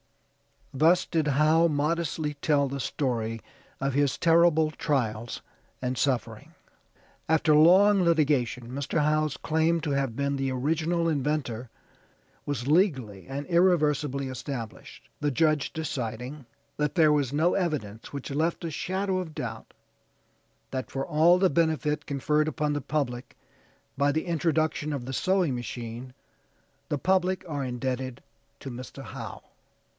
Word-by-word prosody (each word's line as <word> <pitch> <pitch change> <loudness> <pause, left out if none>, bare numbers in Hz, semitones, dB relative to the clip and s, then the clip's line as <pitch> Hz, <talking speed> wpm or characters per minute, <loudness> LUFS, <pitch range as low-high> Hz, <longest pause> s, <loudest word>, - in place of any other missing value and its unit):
Thus 165 +6 +4
did 160 -3 0
Howe 155 +4 +4
modestly 155 0 -1
tell 140 -1 +2
the 140 +1 -4
story 115 -5 -2 0.4
of 135 0 0
his 145 0 +1
terrible 165 -2 +4
trials 120 -7 -2 0.4
and 125 0 -1
suffering. 130 -1 -2 0.7
After 160 -1 +4
long 190 +6 +6
litigation 145 -8 +1
Mr. 140 +3 -1
Howe's 155 -1 +1
claim 160 +1 +1
to 150 -2 -2
have 135 -4 -1
been 140 +1 -1
the 135 0 -1
original 160 +6 0
inventor 135 -5 -2 0.8
was 140 -3 -3
legally 130 - +1
and 140 +2 -4
irreversibly 150 -6 +2
established, 125 -3 -7
the 150 - +1
judge 155 +1 +1
deciding, 130 -2 -5 0.3
"that 150 -1 -1
there 160 -3 +5
was 145 -3 +1
no 160 +4 +2
evidence 140 - -3
which 140 0 -5
left 160 +5 -1
a 165 - -3
shadow 190 +4 -1
of 160 -4 -6
doubt 115 -2 -6 1.0
that 130 -1 -4
for 135 0 -3
all 165 +4 +4
the 190 0 +3
benefit 150 -1 0
conferred 150 +2 +1
upon 150 -1 -1
the 145 - -2
public 130 -5 -3 0.6
by 140 0 +3
the 160 +4 -1
introduction 160 -3 0
of 135 -4 -4
the 130 - -5
sewing 185 -1 +1
machine 120 0 -6 0.8
the 145 - 0
public 185 +3 +1
are 145 -3 -3
indebted 130 0 -3 0.4
to 135 - -6
Mr. 125 +1 -8
Howe." - - -8
145 Hz, 135 wpm, -27 LUFS, 130-160 Hz, 1.0 s, long